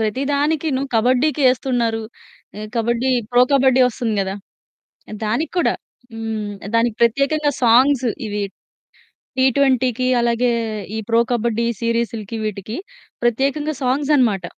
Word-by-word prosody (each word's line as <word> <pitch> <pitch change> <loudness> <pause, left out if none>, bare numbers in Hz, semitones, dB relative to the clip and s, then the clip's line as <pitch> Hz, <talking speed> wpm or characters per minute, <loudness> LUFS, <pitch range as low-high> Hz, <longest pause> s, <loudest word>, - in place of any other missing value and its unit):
ప్రతిదానికి 280 +7 0
నువ్వు 275 +1 -3
కబడ్డీకి 255 +6 +2
ఎస్తున్నారు 240 -3 -1 0.6
ఆహ్, 215 0 -6
కబడ్డీ 235 +3 0 0.2
ప్రో 245 0 +5
కబడ్డీ 265 -1 +4
వస్తుంది 235 -2 -3
కదా 190 0 -2 0.9
దానికి 240 +10 -1
కూడా - - +2 0.4
హ్మ్. 220 -2 -4 0.2
దానికి 230 -1 +2
ప్రత్యేకంగా 280 +5 +2
సాంగ్సు 250 +2 +4 0.2
ఇవి 210 0 -3 1.0
టీ 260 - +4
ట్వెంటీకి 255 -3 +2
అలాగే 235 +1 +1 0.5
ఈ - - -2
ప్రో 230 0 +3
కబడ్డీ 235 0 0
సీరీస్‌లకి 230 -2 -2
వీటికి 215 +2 -4 0.5
ప్రత్యేకంగా 275 +6 0
సాంగ్స్ 270 +3 0
అన్నమాట. 210 -9 +1
240 Hz, 115 wpm, -20 LUFS, 225-270 Hz, 1.0 s, ప్రో